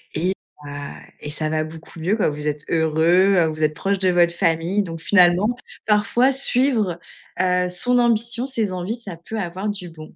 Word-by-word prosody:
et 180 +4 0 0.3
bah 145 0 -7 0.2
et 150 - -7
ça 155 0 -1
va 155 0 0
beaucoup 160 +1 -11
mieux 185 +6 0
quoi. 220 - +1
Vous 150 0 -5
êtes 150 0 -2
heureux, 165 +3 +3
vous 155 0 -3
êtes 155 0 +2
proches 195 +4 -1
de 185 -1 +2
votre 175 -1 +3
famille. 170 +3 0
Donc 165 -3 -7
finalement, 180 +3 +4 0.4
parfois, 215 +5 +3
suivre, 250 -9 +1 0.4
heu, 180 0 +1
son 245 +8 +2
ambition, 235 +1 +2
ses 225 -7 -2
envies, 185 +6 -3
ça 200 -8 -9
peut 195 +7 -7
avoir 190 +2 -4
du 195 -4 -5
bon. 155 -1 -13
180 Hz, 185 wpm, -21 LUFS, 160-210 Hz, 0.4 s, finalement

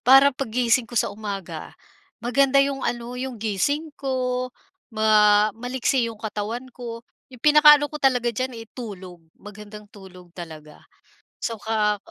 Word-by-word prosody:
para 270 +3 +7
paggising 245 -2 0
ko 240 - -9
sa - - +1
umaga, 200 -3 -7 0.4
maganda 270 +3 +2
'yong 275 -1 -3
ano, 240 -1 -3
'yong 250 0 -5
gising 255 +9 -1
ko 255 -2 -2 0.4
ma 215 -2 +4
maliksi 245 +1 -1
'yong 225 - -8
katawan 215 +3 -4
ko, 235 -1 -8 0.2
'yong 250 -2 -16
pinakaano 300 -1 +7
ko 300 - -6
talaga 250 -3 +2
diyan, 255 +1 -3
eh, 225 - -8
tulog, 190 -7 -9 0.2
magandang 210 +1 -11
tulog 185 -3 -14
talaga. 155 -4 -10 0.6
So, 230 - -3
ka 210 -1 0
230 Hz, 140 wpm, -23 LUFS, 210-260 Hz, 0.6 s, para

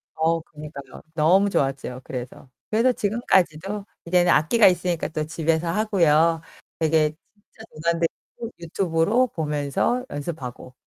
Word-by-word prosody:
어, 165 +1 +1
그니까요. 150 -3 -11
너무 175 +6 +4
좋았죠, 135 -5 -2
그래서. 125 +1 -8 0.2
그래서 230 +4 +3
지금까지도 195 -3 0 0.2
이제는 175 +1 +3
악기가 205 +9 +5
있으니까 175 -2 +1
또 155 -1 -3
집에서 165 +1 -1
하고요. 165 -5 +3 0.4
되게 155 -1 +3 0.2
진짜 215 +1 -18
돈 155 - -15
안 165 - -4
들이고 225 +7 -4
유튜브로 170 +7 +1
보면서 150 - -1
연습하고. 135 -4 -6
165 Hz, 320 characters per minute, -24 LUFS, 150-195 Hz, 0.4 s, 악기가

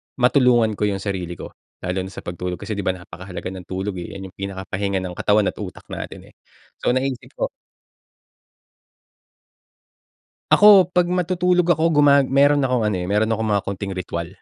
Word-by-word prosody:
matulungan 125 -3 +4
ko 105 - +2
yung 100 -1 -3
sarili 90 -4 -3
ko, - - -9 0.3
lalo 90 +1 -2
na 95 - -8
sa - - -9
pagtulog?" 90 +1 -4
Kasi 110 - -5
'di - - -2
ba, 95 - +1
napakahalaga 90 0 -8
ng 95 -1 -9
tulog, 95 +1 -4
eh, 85 - -8
yan 95 -1 -8
yung - - -60
pinakahinga 95 0 -3
ng 90 -1 -6
katawan 105 -1 +2
at - - -27
utak - - -7
natin - - -8
eh, - - -36 0.5
so - - +1
naisip 130 -1 -2
ko - - -2 3.0
Ako 205 -4 +7
'pag 180 -1 +2
matutulog 180 0 +1
ako, 160 -2 +3
guma 140 -1 +6
meron 140 +1 +3
akong 125 -2 +1
ano, 105 - -1
eh, 90 - -3
meron 105 +4 +1
akong 110 0 -1
mga 100 -1 +1
konting 100 0 -4
ritwal, 85 -2 -4
105 Hz, 175 wpm, -21 LUFS, 95-140 Hz, 3.0 s, Ako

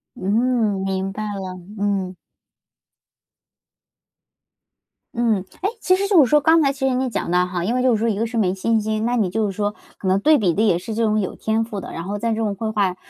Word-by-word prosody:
嗯， 215 0 +1
明 190 0 -2
白 215 +2 -5
了， 190 -2 -5 0.3
嗯。 195 -2 -1 3.0
嗯， 225 -5 0 0.2
哎， 390 - +1
其 370 - +3
实 395 +1 -1
就 390 -4 +5
是 245 - 0
说， 300 +1 +4
刚 320 +2 +5
才 275 -1 +2
其 270 -1 -1
实 260 - +1
你 260 +1 0
也 - - -2
讲 200 -6 -3
的 180 0 +3
哈， 180 -1 -3
因 225 +7 0
为 255 - +1
就 255 -2 +3
是 210 - -2
说 230 - +1
一 205 - -1
个 230 - 0
是 230 +1 -5
没 185 -4 +2
信 220 +3 0
心， 215 +1 -1
那 245 - +1
你 210 -6 +1
就 220 +4 0
是 200 - -2
说， 205 0 -1 0.2
可 190 - -5
能 190 +1 +3
对 305 +8 +5
比 185 -6 +1
的 210 - 0
也 200 -6 +3
是 215 +5 -6
这 230 - -1
种 215 -1 +2
有 190 - -3
天 220 +1 0
赋 220 -3 -6
的， - - -8
然 165 - -5
后 200 +3 -4
在 230 +2 -1
这 - - -1
种 215 -2 -1
绘 220 +2 -3
画 200 -4 0
215 Hz, 260 characters per minute, -21 LUFS, 195-235 Hz, 3.0 s, 就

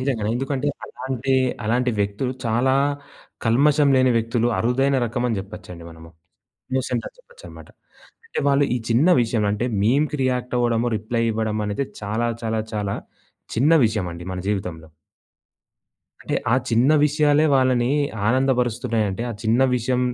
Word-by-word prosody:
నిజంగనే. 125 -6 -1
ఎందుకంటే 135 +2 -2 0.2
అలాంటి 130 +1 -3 0.3
అలాంటి 125 +3 +1
వ్యక్తులు 100 +6 -1
చాలా 120 +4 +2 0.7
కల్మషం 140 +5 +3
లేని 130 0 +4
వ్యక్తులు, 115 +1 0
అరుదైన 135 +4 +1
రకమని 120 -1 -1
జెప్పొచ్చండి 95 -3 -9
మనము. 80 0 -13 0.6
ఇన్నోసెంటని 130 -2 -2
జెప్పొచ్చన్నమాట. - - -14 0.6
అంటే 455 - -4
వాళ్ళు 140 0 +3
ఈ - - +1
చిన్న 120 +8 +3
విషయంలో 110 -3 0
అంటే 105 +4 -2 0.2
మీమ్‌కి 145 +8 +1
రియాక్ట్ 125 -1 -1
అవ్వడము, 120 0 +1
రిప్లై 115 +2 -2
ఇవ్వడం 110 -1 -2
అనేది 105 +6 -2 0.2
చాలా 110 +3 -1 0.2
చాలా 110 -1 -1
చాలా 105 -2 -2 0.6
చిన్న 135 +8 +3
విషయం 105 -3 -1
అండి 85 +1 -8
మన 90 - -4
జీవితంలో. 90 -5 -4 1.4
అంటే, - - -2 0.2
ఆ - - +6 0.2
చిన్న 120 +5 +3 0.2
విషయాలే 150 0 +3
వాళ్ళని 130 -2 +2 0.4
ఆనందబరుస్తున్నాయంటే, 120 -4 0
ఆ - - -3
చిన్న 115 +3 +2 0.2
విషయం, 125 +1 0
120 Hz, 130 wpm, -22 LUFS, 110-130 Hz, 1.4 s, ఆ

